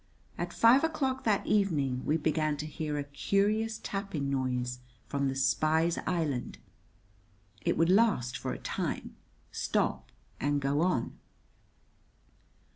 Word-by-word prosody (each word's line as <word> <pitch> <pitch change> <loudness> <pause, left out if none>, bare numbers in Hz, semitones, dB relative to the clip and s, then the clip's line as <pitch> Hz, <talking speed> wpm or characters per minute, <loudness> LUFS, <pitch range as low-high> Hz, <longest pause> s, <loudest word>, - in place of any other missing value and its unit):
At - - -4
five 240 +5 +5
o'clock 275 -5 -1
that 210 -3 +2
evening 145 -11 +1
we 155 - +3
began 155 -1 0
to 150 - -4
hear 155 -1 -3
a 145 - -1
curious 210 +9 0
tapping 185 -9 -3
noise 125 -2 -1 0.3
from 140 -1 -1
the 135 - -2
spy's 155 +5 +2
island. 150 -8 -1 1.0
It 170 - 0
would 165 +2 +4
last 195 - +3
for - - -3
a - - -4
time, - - -4 0.4
stop, - - -1 0.3
and 145 0 +1
go 140 +2 +1
on. 170 -10 0
155 Hz, 125 wpm, -30 LUFS, 140-200 Hz, 1.0 s, five